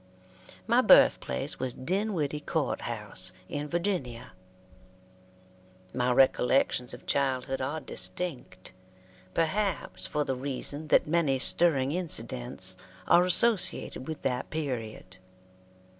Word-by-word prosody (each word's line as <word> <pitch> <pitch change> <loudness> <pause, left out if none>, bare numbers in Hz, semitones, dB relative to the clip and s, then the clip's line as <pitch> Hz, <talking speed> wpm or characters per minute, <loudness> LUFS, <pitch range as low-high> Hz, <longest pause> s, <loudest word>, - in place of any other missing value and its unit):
My - - +3
birthplace 65 0 +3
was 130 -2 -3
Dinwiddie 170 -2 -2
Court 150 0 -2
House, 100 -5 -4
in 145 +1 -5
Virginia. 170 - -3 1.6
My 125 0 0
recollections 125 0 +3
of - - -15
childhood 135 -1 -1
are 140 +4 -3
distinct, 95 - -2 0.6
perhaps 195 +5 -1
for 150 - -1
the 135 - -2
reason 140 +3 -4
that - - +3
many 150 -4 +1
stirring 140 -1 +4
incidents 120 - -3 0.3
are 175 - +5
associated 185 - +2
with 160 -2 -7
that 125 -1 -2
period. 115 -11 -5
140 Hz, 100 wpm, -28 LUFS, 125-165 Hz, 1.6 s, are